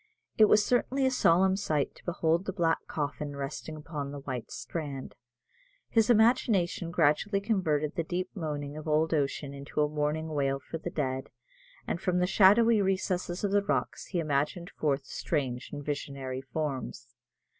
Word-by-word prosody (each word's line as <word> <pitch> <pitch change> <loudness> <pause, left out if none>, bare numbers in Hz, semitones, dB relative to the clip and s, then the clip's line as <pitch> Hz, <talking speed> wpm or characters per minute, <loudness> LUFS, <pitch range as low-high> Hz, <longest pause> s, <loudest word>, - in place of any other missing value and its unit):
It 215 - +7
was 210 0 +4
certainly 265 +2 +1
a 260 - +3
solemn 190 -5 +4
sight 155 -8 -1
to - - -19
behold 170 0 +1
the - - -2
black 170 -4 +1
coffin 145 -1 -3
resting 140 +3 -5
upon 150 -2 -5
the 145 -1 -7
white 130 -4 -5
strand. 145 -5 -5 0.8
His 225 -1 +3
imagination 220 -7 +3
gradually 170 +5 +2
converted 165 -8 0
the 165 - -1
deep 180 +3 -3
moaning 150 -5 -4
of 155 +1 -7
old 155 +1 +2
ocean 140 -1 -1
into 140 +2 -6
a 150 - +4
mournful 155 +1 -2
wail 135 -2 +1
for 165 +4 -7
the 175 - -4
dead, 130 -5 -2 0.6
and 170 - -3
from 180 -1 +1
the 180 - +3
shadowy 210 +4 +5
recesses 185 -2 -1
of 200 - +1
the 205 0 +4
rocks 200 - -2
he 180 - -2
imaged 155 +4 -1
forth 140 -2 -1
strange 135 -5 -2
and 145 - -6
visionary 140 -3 -4
forms. 130 - -4
160 Hz, 165 wpm, -29 LUFS, 145-190 Hz, 0.8 s, It